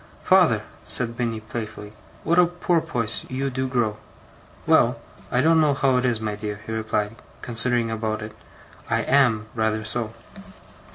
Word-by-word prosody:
'Father!' -, -, +4 dB, 0.2 s
said 115 Hz, -1 st, -1 dB
Minnie, 115 Hz, -2 st, -1 dB
playfully. 110 Hz, -2 st, -7 dB, 0.3 s
'What 170 Hz, +3 st, +3 dB
a 175 Hz, -, +6 dB
porpoise 165 Hz, -10 st, -1 dB
you 135 Hz, +1 st, -2 dB
do 130 Hz, +1 st, -1 dB
grow!' 120 Hz, -5 st, 0 dB, 0.7 s
'Well, -, -, +4 dB, 0.3 s
I 125 Hz, -, +3 dB
don't 160 Hz, +2 st, +5 dB
know 150 Hz, -2 st, +3 dB
how 135 Hz, -2 st, +3 dB
it 125 Hz, -, +1 dB
is, 120 Hz, -3 st, +1 dB
my 110 Hz, -1 st, -2 dB
dear,' 105 Hz, 0 st, -5 dB
he 110 Hz, -, -6 dB
replied, 110 Hz, 0 st, -1 dB, 0.3 s
considering 120 Hz, -1 st, 0 dB
about 110 Hz, -1 st, -2 dB
it. 110 Hz, 0 st, -8 dB, 0.5 s
'I -, -, +2 dB
am 120 Hz, -6 st, +3 dB
rather 110 Hz, -1 st, 0 dB
so. 110 Hz, 0 st, -2 dB
115 Hz, 155 wpm, -24 LUFS, 110-130 Hz, 0.7 s, a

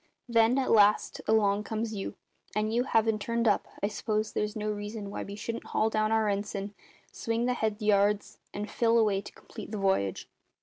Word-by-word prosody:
Then, 230 Hz, +1 st, +4 dB
at 265 Hz, -, +1 dB
last, 210 Hz, -1 st, +4 dB
along 210 Hz, -2 st, +3 dB
comes 220 Hz, +1 st, -3 dB
you, 195 Hz, -2 st, -5 dB, 0.4 s
and 215 Hz, +1 st, 0 dB
you 245 Hz, +2 st, +2 dB
havin' 225 Hz, -3 st, +2 dB
turned 230 Hz, +2 st, 0 dB
up, 205 Hz, -, +2 dB, 0.2 s
I -, -, +3 dB
s'pose 215 Hz, +1 st, -2 dB
there's 210 Hz, +1 st, -2 dB
no 215 Hz, -1 st, -2 dB
reason 205 Hz, 0 st, -5 dB
why -, -, -4 dB
we 200 Hz, -, -6 dB
shouldn't 230 Hz, +2 st, -5 dB
haul 220 Hz, +1 st, +1 dB
down 215 Hz, 0 st, +1 dB
our 220 Hz, -1 st, +2 dB
ensign, 200 Hz, 0 st, -2 dB, 0.4 s
swing 230 Hz, +1 st, -2 dB
the 250 Hz, -, +2 dB
head 220 Hz, -3 st, -1 dB
yards, 205 Hz, -1 st, +1 dB
and 210 Hz, +1 st, -4 dB
fill 230 Hz, 0 st, +2 dB
away 210 Hz, -4 st, +3 dB
to -, -, -11 dB
complete -, -, -11 dB
the 215 Hz, -, -4 dB
v'yage?" 190 Hz, -, 0 dB
215 Hz, 190 wpm, -29 LUFS, 205-225 Hz, 0.4 s, Then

